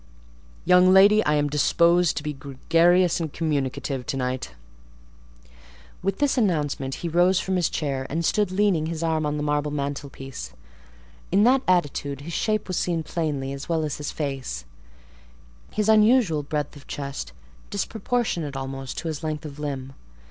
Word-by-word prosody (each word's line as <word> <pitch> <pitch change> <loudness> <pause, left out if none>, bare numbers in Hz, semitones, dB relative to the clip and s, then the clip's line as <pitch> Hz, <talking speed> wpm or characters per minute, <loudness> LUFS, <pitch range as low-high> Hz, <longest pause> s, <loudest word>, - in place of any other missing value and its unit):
Young 180 +1 +6
lady, 200 +3 +7
I 150 - +3
am 145 0 +2
disposed 170 +4 +3
to 150 - -3
be 150 -1 -3
gregarious 165 +7 +2
and 160 -3 -3
communicative 140 -4 -2
to 135 - -2
night." 125 - -3 1.5
With 195 +1 -1
this 285 -2 +2
announcement 145 - 0
he - - +1
rose 175 +3 +3
from 190 0 -1
his 175 -2 +1
chair, 135 -3 -2
and 165 +3 -1
stood, 210 +2 +2
leaning 185 -5 +2
his 165 0 -4
arm 160 -2 0
on 150 0 -2
the 150 - -2
marble 150 0 0
mantelpiece: 140 - -5 0.8
in 195 +3 +4
that 255 +3 +5
attitude 145 -6 0
his 165 +4 -7
shape 215 +4 0
was 185 - -2
seen 170 -2 0
plainly 145 -5 -2
as 140 +3 -8
well 165 -2 +1
as 150 -2 -3
his 150 - -4
face; 135 - -4 1.1
his 210 0 -1
unusual 215 - +4
breadth 150 0 -3
of 145 - -14
chest, 140 -1 -5 0.4
disproportionate 200 - -2
almost 135 0 -5
to 170 - -4
his 155 -2 -4
length 155 0 -3
of 150 -1 -8
limb. 135 -2 -4
155 Hz, 160 wpm, -24 LUFS, 140-180 Hz, 1.5 s, lady